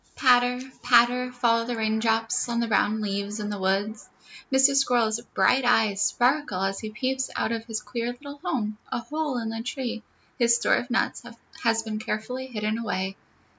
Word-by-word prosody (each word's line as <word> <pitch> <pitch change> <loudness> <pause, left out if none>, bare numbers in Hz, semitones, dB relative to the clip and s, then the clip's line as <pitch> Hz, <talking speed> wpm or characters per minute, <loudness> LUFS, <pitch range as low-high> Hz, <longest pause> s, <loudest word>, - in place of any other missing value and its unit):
Patter, 250 -2 +4 0.2
patter, 245 +1 +4
fall 235 -2 +2
the 245 0 -3
raindrops 225 +1 0
on 235 0 0
the 235 - +1
brown 215 0 +1
leaves 200 +1 -3
in 210 0 -3
the 205 - -4
woods. 200 +3 -1 0.4
Mr. 265 +1 +5
Squirrel's 235 -4 +2
bright 265 +1 +4
eyes 220 -4 +3
sparkle 245 -6 +1
as 195 0 -1
he 215 - -5
peeps 260 +4 -2
out - - 0
of 230 -1 -3
his 225 -2 -4
queer 235 -1 -3
little 285 +3 -11
home, 215 -6 -2
a - - 0
hole 300 0 -3
in 225 -2 -3
the 225 0 -4
tree; 240 -2 -4 0.4
his 235 -1 +5
store - - +2
of 245 - -4
nuts 245 - 0 0.4
has 225 -1 +2
been 215 -1 -4
carefully 250 +4 -4
hidden 215 -2 -2
away. 195 -4 -2
230 Hz, 175 wpm, -26 LUFS, 215-250 Hz, 0.4 s, Mr